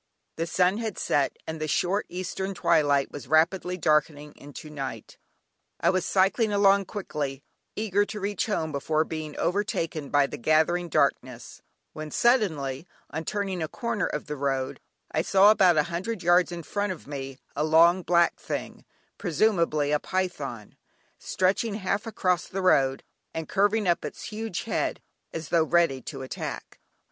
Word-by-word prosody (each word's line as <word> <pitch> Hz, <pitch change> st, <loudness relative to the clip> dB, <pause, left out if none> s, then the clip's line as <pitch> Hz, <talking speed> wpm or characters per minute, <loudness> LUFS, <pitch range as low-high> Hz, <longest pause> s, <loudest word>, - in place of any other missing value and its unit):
The 165 Hz, +1 st, -1 dB
sun 180 Hz, +5 st, +2 dB
had 220 Hz, -5 st, -4 dB
set, 140 Hz, -2 st, 0 dB
and 160 Hz, -1 st, -6 dB
the 155 Hz, -, -1 dB
short 185 Hz, +7 st, 0 dB
eastern 190 Hz, +2 st, -4 dB
twilight 145 Hz, -5 st, +2 dB
was 140 Hz, -5 st, -8 dB
rapidly 180 Hz, +4 st, +2 dB
darkening 150 Hz, -2 st, +1 dB
into 145 Hz, +2 st, -11 dB
night. 135 Hz, -3 st, -7 dB, 0.6 s
I -, -, +3 dB
was 185 Hz, -2 st, -1 dB
cycling 200 Hz, +3 st, +2 dB
along 200 Hz, -1 st, +4 dB
quickly, 145 Hz, -9 st, -4 dB, 0.3 s
eager 205 Hz, -2 st, +1 dB
to 210 Hz, 0 st, -6 dB
reach 200 Hz, -1 st, -2 dB
home 160 Hz, -7 st, -1 dB
before 155 Hz, +2 st, 0 dB
being 155 Hz, -2 st, -6 dB
overtaken 165 Hz, -5 st, -1 dB
by 145 Hz, -1 st, +4 dB
the -, -, -7 dB
gathering 160 Hz, +5 st, +2 dB
darkness, 125 Hz, -5 st, -1 dB, 0.3 s
when 155 Hz, 0 st, -6 dB
suddenly, 160 Hz, -, +1 dB, 0.2 s
on 160 Hz, +1 st, -4 dB
turning 195 Hz, -3 st, -2 dB
a 160 Hz, -, -1 dB
corner 235 Hz, +4 st, -2 dB
of 150 Hz, -, -4 dB
the 150 Hz, -, -5 dB
road, 135 Hz, -2 st, -2 dB, 0.3 s
I -, -, +1 dB
saw, 195 Hz, +2 st, +6 dB
about 185 Hz, -6 st, +4 dB
a 150 Hz, -, +5 dB
hundred 190 Hz, +3 st, -3 dB
yards 175 Hz, +1 st, +4 dB
in 170 Hz, -1 st, -6 dB
front 205 Hz, +2 st, -2 dB
of 180 Hz, -, -8 dB
me, 135 Hz, -2 st, -6 dB, 0.2 s
a 150 Hz, -, 0 dB
long 165 Hz, +4 st, +5 dB
black 170 Hz, 0 st, +2 dB
thing, -, -, -5 dB, 0.3 s
presumably 170 Hz, -5 st, +1 dB
a 150 Hz, -, +2 dB
python, 145 Hz, -, -4 dB, 0.4 s
stretching 200 Hz, +4 st, 0 dB
half 205 Hz, +2 st, -2 dB
across 185 Hz, -5 st, 0 dB
the 195 Hz, 0 st, -4 dB
road, 135 Hz, -7 st, +3 dB, 0.3 s
and 160 Hz, -1 st, -4 dB
curving 205 Hz, +1 st, +2 dB
up 175 Hz, -, +2 dB
its -, -, -7 dB
huge 220 Hz, -4 st, -4 dB
head, 230 Hz, -, -1 dB, 0.3 s
as 165 Hz, -2 st, -6 dB
though 170 Hz, -2 st, +4 dB
ready 165 Hz, -5 st, +2 dB
to 135 Hz, +1 st, -7 dB
attack. 130 Hz, -, -6 dB
170 Hz, 160 wpm, -26 LUFS, 150-195 Hz, 0.6 s, saw